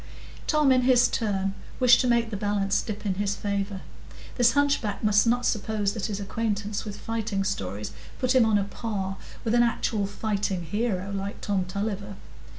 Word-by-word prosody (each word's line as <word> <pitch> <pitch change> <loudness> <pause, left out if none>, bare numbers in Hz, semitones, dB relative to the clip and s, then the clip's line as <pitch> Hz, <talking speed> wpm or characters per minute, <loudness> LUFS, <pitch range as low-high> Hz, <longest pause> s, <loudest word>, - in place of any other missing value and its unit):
Tom, 300 -3 +4
in 255 -1 +5
his 250 -1 +5
turn, 195 -3 -1 0.3
wished 250 -2 +6
to 255 - +1
make 235 -2 +2
the - - -3
balance 200 -1 0
dip 215 -1 -6
in 195 - +1
his 200 0 0
favour. 200 -1 -2 0.5
This 240 -2 +4
hunchback 280 -8 +1
must 210 +1 +4
not 245 +1 +2
suppose 210 -2 0
that 220 -1 -3
his 205 -2 -3
acquaintance 205 0 -2
with 205 -1 -6
fighting 220 -3 -2
stories 105 - -3 0.3
put 255 0 +1
him 255 -2 +6
on 220 -2 +3
a 200 - +1
par 195 -2 -4 0.3
with 225 - 0
an 240 - +5
actual 225 -3 +1
fighting 200 -3 -2
hero, 200 +1 -2
like 200 0 -4
Tom 195 -3 -1
Tulliver. 200 +1 -4
205 Hz, 175 wpm, -26 LUFS, 195-230 Hz, 0.5 s, wished